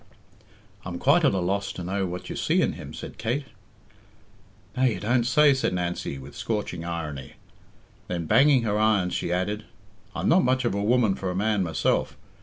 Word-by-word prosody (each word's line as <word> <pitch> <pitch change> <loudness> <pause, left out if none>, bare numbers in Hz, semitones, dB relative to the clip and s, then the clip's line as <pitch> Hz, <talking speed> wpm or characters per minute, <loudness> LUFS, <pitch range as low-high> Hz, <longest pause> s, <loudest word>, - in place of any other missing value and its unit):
"I'm 85 -1 -5
quite 145 - +3
at 135 -9 +3
a - - +1
loss 95 +3 -1
to 90 - -6
know 95 +2 -1
what 90 0 -6
you - - -5
see - - +1
in - - 0
him," - - -9
said - - -9
Kate. 120 +6 -1 1.3
"Now, 130 0 +2
you 120 - +1
don't 120 +3 +1
say!" 150 +1 +5
said 130 -8 -1
Nancy 90 -5 -3
with 65 +2 -11
scorching 105 -6 -3
irony. 80 -6 -5 0.7
Then, 85 -2 -3
banging 135 - +5
her 105 -1 0
irons, 105 -4 +2
she - - -2
added, 100 +4 -1 0.5
"I'm - - -2
not 180 +2 +5
much 130 0 +1
of 120 - +1
a 100 - -1
woman 115 -1 +3
for 95 -1 -4
a 90 - -3
man 105 +1 +1
myself. 80 -6 0
100 Hz, 190 wpm, -25 LUFS, 90-120 Hz, 1.3 s, say